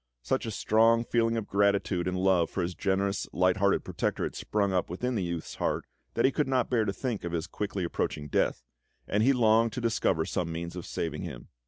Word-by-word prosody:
Such 60 - -1
a - - -1
strong 115 +2 +3
feeling 115 -1 +1
of 110 -2 -3
gratitude 100 -3 +1
and 90 0 -1
love 90 -3 +3
for 95 - -2
his 90 +1 -2
generous, 100 +1 0
light 90 0 +3
hearted 100 0 +2
protector - - -2
had - - -2
sprung 100 -2 -1
up 90 - 0
within 125 +9 -2
the 110 - 0
youth's 85 -2 -4
heart - - -1 0.3
that - - +3
he 135 - +4
could 150 +1 0
not 130 -2 +1
bear 115 -3 +3
to 100 - 0
think 120 -4 -3
of 85 0 -4
his 80 -2 -1
quickly 100 -2 -3
approaching 75 -3 -2
death, - - 0 0.4
and 105 - +1
he 130 +5 +5
longed 115 -3 +3
to - - -3
discover 110 -8 +1
some 85 -2 -2
means 85 +1 -5
of 90 - -6
saving - - -3
him. - - -7
100 Hz, 220 wpm, -29 LUFS, 90-115 Hz, 0.4 s, he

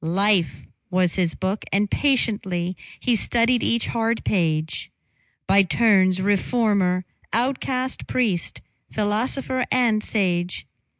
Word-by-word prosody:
Life 190 +1 +1 0.2
was 180 -2 +1
his 175 -3 0
book, 190 +3 -3
and 205 +1 +1
patiently 195 -9 0 0.2
He 245 - +1
studied 235 +2 +2
each 235 0 0
hard 230 0 -1
page; 160 -5 -1 0.6
By 200 - +5
turns 190 -2 +3
reformer, 200 -2 +1 0.3
outcast, 255 +1 -1
priest, 215 -9 -1 0.3
Philosopher 245 +5 -1
and 230 -4 +2
sage. 180 -4 -1
205 Hz, 105 wpm, -22 LUFS, 185-235 Hz, 0.6 s, By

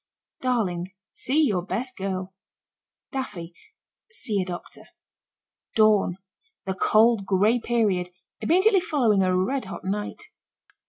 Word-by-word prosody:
DARLING. 190 -8 -1 0.2
See 295 +5 +1
your 200 -11 +1
best 230 +8 -4
girl. 190 -1 -4 0.8
DAFFY. 180 -11 -5 0.6
See 215 - -2
a - - -2
doctor. 175 -1 -8 0.9
DAWN. 210 -5 +4 0.5
The 190 - -1
cold, 215 +2 +3
gray 210 +5 +3
period 210 -7 0 0.3
immediately 380 +3 +4
following 240 - +2
a 185 -1 +2
red 255 +8 0
hot 190 - -8
night. 210 - -4
210 Hz, 110 wpm, -25 LUFS, 185-250 Hz, 0.9 s, DAWN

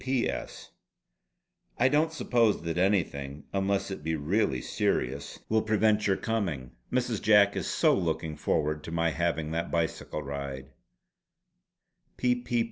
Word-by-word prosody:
"P.P.S. 130 -2 -2 1.1
I 125 - +4
don't 150 +4 +2
suppose 120 - +2
that 85 +1 -2
anything, 75 -8 0
unless 100 0 0
it 85 -6 -6
be 80 +1 0
really 75 - +1
serious, 70 +3 -1
will 110 0 +2
prevent 110 -1 +2
your 95 - +2
coming. 85 - -2 0.2
Mrs. 125 -4 0
Jack 105 -2 +5
is - - -2
so - - +3
looking 80 -3 -1
forward 75 0 0
to - - -6
my 85 0 +1
having 80 -1 -1
that 85 +1 -2
bicycle 80 -2 -2
ride. 70 -1 -6
85 Hz, 125 wpm, -29 LUFS, 75-105 Hz, 1.1 s, Jack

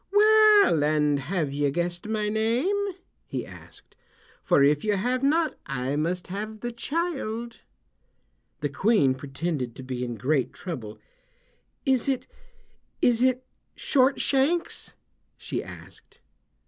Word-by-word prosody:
"Well, 425 - +6
and 150 -1 +2
have 150 0 -2
you 145 0 +1
guessed 175 +5 -3
my 215 -1 -1
name?" 265 - 0 0.3
he - - -4
asked; - - -13 0.5
"for 140 - +3
if 145 +1 +3
you 210 -1 +1
have 250 +6 0
not 310 +3 +2
I 135 0 -2
must 170 +4 -1
have 215 +3 -6
the 240 - -3
child." 240 -5 -3 1.0
The 145 - -1
Queen 145 - +3
pretended 135 -1 -4
to 130 - -9
be 130 -1 -4
in 120 -1 -4
great 135 +3 0
trouble. 125 - -6 0.9
"Is 265 -1 +2
it—is 275 - -3
it 255 0 +2 0.3
Short 270 -1 +3
Shanks?" 290 +6 0 0.4
she - - -4
asked. - - -11
210 Hz, 120 wpm, -26 LUFS, -, 1.0 s, Well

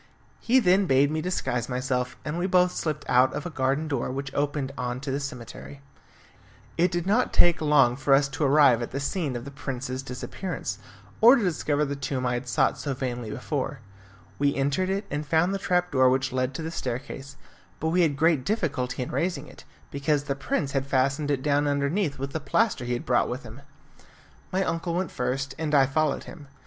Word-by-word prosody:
He 245 +3 +3
then 190 -3 +3
bade 140 +1 +4
me 155 0 -1
disguise 130 -9 -2
myself, 125 0 -2
and 150 +1 -3
we 180 - 0
both 180 -1 +4
slipped 150 -4 -3
out 125 +1 +4
of 150 - -4
a 175 - -4
garden 135 +2 0
door 140 -6 -2
which 135 0 -5
opened 145 -1 -1
on 125 -1 -3
to 135 0 -4
the 140 - -1
cemetery. 140 0 -8 1.0
It 175 +2 +3
did 175 -1 -2
not 215 +6 +2
take 175 -2 +4
long 145 -5 +4
for 135 +1 +3
us 140 0 +3
to 135 +3 -3
arrive 140 -4 +5
at 120 - -3
the 135 - -4
scene 140 -1 -2
of 120 +1 -5
the 140 - -7
prince's 130 -2 -4
disappearance, 135 +8 -5 0.4
or 235 +4 +9
to 240 - 0
discover 150 -4 0
the 140 0 -3
tomb 135 -2 -3
I 125 - +1
had 120 +1 -3
sought - - +2
so 140 -2 -3
vainly 125 -3 -4
before. 135 +2 -3 0.6
We 140 0 +2
entered 140 +7 0
it, 195 +2 -1
and 145 +1 -2
found 160 +5 +2
the 195 - -2
trap 180 -2 0
door 130 -2 +5
which 130 0 0
led 130 +1 -1
to 160 - -4
the 160 - -4
staircase, 135 0 -5 0.4
but 160 - 0
we 180 +2 +3
had 150 -5 +2
great 160 -3 +3
difficulty 140 - -1
in - - -7
raising 165 -5 -1
it, - - -14 0.3
because 140 +1 0
the 145 - -2
prince 140 - -2
had 135 0 -1
fastened 135 +2 +1
it 135 -2 0
down 145 0 +2
underneath 145 +3 0
with 135 +1 -4
the 160 - -1
plaster 200 - +1
he 120 - -1
had 120 - -3
brought 125 - +2
with 125 +2 -4
him. 120 +3 -11 0.9
My 190 +1 +1
uncle 165 -1 -2
went 185 -2 -1
first, 130 +2 -2
and 155 -2 0
I 135 -1 +6
followed 150 +2 0
him. 145 -4 -11
140 Hz, 210 wpm, -26 LUFS, 130-160 Hz, 1.0 s, or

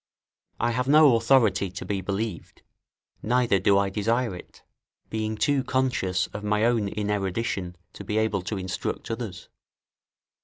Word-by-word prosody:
I 120 +1 +1
have 125 +2 -1
no 150 -3 +6
authority 115 -5 +3
to 90 - -7
be 100 -2 -2
believed, 100 0 -4 0.6
neither 120 -3 +2
do 100 +2 +4
I 100 -1 +1
desire 115 +2 0
it, 90 - -13 0.5
being 110 0 -2
too 140 +2 +1
conscious 125 -10 0
of 105 - -6
my 105 +1 +1
own 115 -4 +2
inerudition 100 -2 -2 0.2
to - - -9
be 105 +2 -2
able 110 -3 +1
to 100 +3 -4
instruct 95 +4 -4
others. 110 -7 -6
105 Hz, 145 wpm, -26 LUFS, 95-120 Hz, 0.6 s, no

